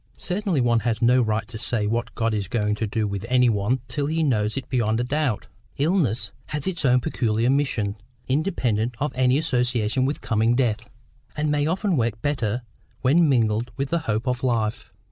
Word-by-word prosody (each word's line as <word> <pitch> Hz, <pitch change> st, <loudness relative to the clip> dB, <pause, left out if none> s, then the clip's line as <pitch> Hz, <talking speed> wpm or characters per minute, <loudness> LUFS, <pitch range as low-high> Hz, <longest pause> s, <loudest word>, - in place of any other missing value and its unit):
"Certainly 185 Hz, -, -1 dB
one 120 Hz, -1 st, +3 dB
has 115 Hz, -1 st, -1 dB
no 125 Hz, +2 st, +4 dB
right 110 Hz, -2 st, -1 dB
to 115 Hz, -2 st, -8 dB
say 115 Hz, -2 st, 0 dB
what 115 Hz, +3 st, -2 dB
God 115 Hz, -1 st, 0 dB
is 100 Hz, -3 st, -2 dB
going 105 Hz, -1 st, 0 dB
to 110 Hz, +1 st, -2 dB
do 105 Hz, +1 st, -1 dB
with 100 Hz, 0 st, -4 dB
any 125 Hz, -1 st, +4 dB
one 110 Hz, +4 st, 0 dB
till 140 Hz, +4 st, -2 dB
he 160 Hz, +2 st, 0 dB
knows 110 Hz, -5 st, +1 dB
it 130 Hz, -2 st, -4 dB
beyond 115 Hz, -3 st, 0 dB
a -, -, +1 dB
doubt. 135 Hz, -3 st, -1 dB, 0.3 s
Illness 145 Hz, -, +1 dB, 0.2 s
has 150 Hz, -1 st, -3 dB
its 185 Hz, -5 st, -1 dB
own 125 Hz, -1 st, +4 dB
peculiar 120 Hz, -4 st, 0 dB
mission, 125 Hz, -8 st, 0 dB, 0.3 s
independent 125 Hz, -, 0 dB
of 150 Hz, +1 st, -1 dB
any 130 Hz, +1 st, +3 dB
association 125 Hz, -5 st, +1 dB
with 140 Hz, +3 st, -1 dB
coming 115 Hz, +1 st, +1 dB
death, 115 Hz, -2 st, 0 dB, 0.5 s
and 150 Hz, 0 st, 0 dB
may 145 Hz, 0 st, +1 dB
often 185 Hz, +1 st, 0 dB
work 115 Hz, -2 st, 0 dB
better 125 Hz, -5 st, -1 dB, 0.4 s
when 150 Hz, +5 st, +4 dB
mingled 115 Hz, -2 st, +1 dB
with 140 Hz, 0 st, -2 dB
the 170 Hz, -, +2 dB
hope 110 Hz, +4 st, -1 dB
of 125 Hz, 0 st, 0 dB
life. 115 Hz, -4 st, -1 dB
125 Hz, 190 wpm, -24 LUFS, 110-140 Hz, 0.5 s, no